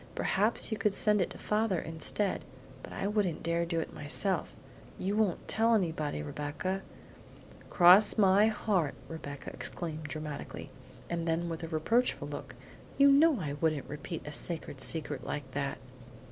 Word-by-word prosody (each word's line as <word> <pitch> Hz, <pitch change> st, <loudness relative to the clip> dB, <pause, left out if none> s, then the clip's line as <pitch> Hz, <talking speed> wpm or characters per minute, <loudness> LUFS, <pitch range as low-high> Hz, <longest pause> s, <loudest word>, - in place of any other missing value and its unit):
Perhaps 210 Hz, +4 st, +2 dB
you 220 Hz, -, -2 dB
could 210 Hz, -3 st, +1 dB
send 210 Hz, -2 st, +3 dB
it 180 Hz, -, 0 dB
to -, -, -9 dB
father 210 Hz, -3 st, 0 dB
instead, 165 Hz, +5 st, 0 dB, 0.4 s
but -, -, -10 dB
I -, -, -4 dB
wouldn't 205 Hz, -5 st, 0 dB
dare 170 Hz, 0 st, 0 dB
to 170 Hz, -, +1 dB
do 165 Hz, -1 st, -1 dB
it -, -, -7 dB
myself. 165 Hz, +5 st, -1 dB, 0.4 s
You 195 Hz, +2 st, -2 dB
won't 210 Hz, -5 st, 0 dB
tell 225 Hz, +1 st, +3 dB
anybody, 160 Hz, -, -1 dB
Rebecca?" 150 Hz, -, -3 dB, 0.9 s
"Cross 185 Hz, +5 st, +7 dB
my 200 Hz, +1 st, +5 dB
heart!" 195 Hz, -8 st, 0 dB
Rebecca 145 Hz, -3 st, -7 dB
exclaimed 160 Hz, -3 st, -4 dB
dramatically; 150 Hz, -1 st, -6 dB, 0.4 s
and 170 Hz, 0 st, -3 dB
then 165 Hz, +1 st, 0 dB
with 165 Hz, -1 st, -5 dB
a 165 Hz, -, -5 dB
reproachful 200 Hz, +11 st, 0 dB
look, -, -, -7 dB, 0.4 s
"you 280 Hz, 0 st, +7 dB
know 290 Hz, -1 st, +5 dB
I 150 Hz, -5 st, -3 dB
couldn't 155 Hz, -1 st, -1 dB
repeat 150 Hz, +3 st, -6 dB
a 150 Hz, -, -6 dB
sacred 155 Hz, -3 st, -2 dB
secret 150 Hz, -5 st, 0 dB
like 140 Hz, -3 st, -5 dB
that! 140 Hz, 0 st, -3 dB
170 Hz, 160 wpm, -31 LUFS, 155-205 Hz, 0.9 s, Cross